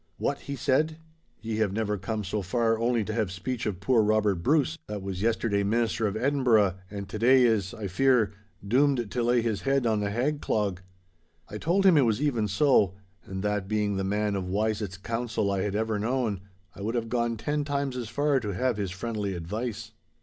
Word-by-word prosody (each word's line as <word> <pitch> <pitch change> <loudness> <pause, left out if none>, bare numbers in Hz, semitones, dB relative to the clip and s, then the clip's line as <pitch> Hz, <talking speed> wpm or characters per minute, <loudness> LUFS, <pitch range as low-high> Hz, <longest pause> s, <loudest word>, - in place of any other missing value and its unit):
'What!' - - -1
he 140 - -6
said, 155 +5 +1 0.5
'ye 110 -1 -2
have 110 -3 +1
never 105 -1 -1
come 105 +2 -3
so 100 +2 -2
far 115 +4 +1
only 120 -1 +1
to 110 - -4
have 110 -5 -1
speech 110 +7 -3
of 95 -4 -3
poor 115 +3 +3
Robert 105 -4 +2
Bruce, 150 - +2
that 105 -2 -5
was 95 -1 -4
yesterday 110 -2 +1
Minister 110 +1 +1
of 100 +1 -3
Edinburgh, 120 -7 +3 0.2
and 100 -1 -6
to 105 +2 -6
day 130 +3 +6
is, 110 -6 +2
I 110 - -6
fear, 110 +1 +2 0.3
doomed 125 -1 +2
to 125 - -1
lay 120 0 +2
his 110 -5 -1
head 135 -2 +1
on 110 -2 +2
the 100 -1 -1
hag 135 +8 -1
clog?' 100 -4 -1 0.7
I 105 - -6
told 190 - +1
him 185 -5 +7
it - - +6
was 115 -4 +2
even 125 -8 +1
so, 100 - +3 0.3
and 95 0 -5
that, 105 -2 -1
being 105 -1 0
the 95 - -1
man 105 +1 0
of 95 -2 -3
wisest 105 -1 -2
counsel 115 -3 -1
I 95 -1 0
had 100 0 -2
ever 110 -1 0
known, 115 -3 -1 0.4
I - - -10
would 110 +4 -2
have 115 -1 -1
gone 120 -1 -1
ten 145 +6 -1
times 140 -2 -2
as 120 -3 -4
far 145 +3 +1
to 105 -6 -4
have 125 +3 0
his 100 -3 -2
friendly 100 0 -3
advice. 110 +6 -4
110 Hz, 210 wpm, -27 LUFS, 100-125 Hz, 0.7 s, him